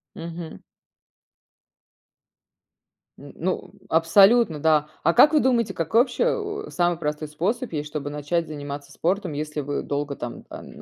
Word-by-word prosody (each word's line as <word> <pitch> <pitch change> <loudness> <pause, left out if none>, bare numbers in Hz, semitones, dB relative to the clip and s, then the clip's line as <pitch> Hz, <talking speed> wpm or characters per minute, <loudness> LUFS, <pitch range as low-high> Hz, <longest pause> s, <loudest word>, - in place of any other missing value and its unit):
Мгм. 165 - -8 2.6
Н - - -12
ну, - - -3 0.2
абсолютно, 195 +3 +5
да. 155 -1 +3 0.2
А 170 - +3
как 295 - +7
вы 305 - +5
думаете, 240 -4 +1
какой 170 +8 +2
вообще, 245 - 0 0.4
а, - - -11
самый 175 -1 +1
простой 150 -1 -3
способ 195 - -2
есть, 150 -1 -3
чтобы 145 -1 -4
начать 150 +3 -2
заниматься 145 -1 -7
спортом? 185 -1 -1
Если 150 +1 -4
вы 145 +1 -3
долго 145 0 -3
там 120 -2 -7
ан - - -10
160 Hz, 140 wpm, -24 LUFS, 150-185 Hz, 2.6 s, как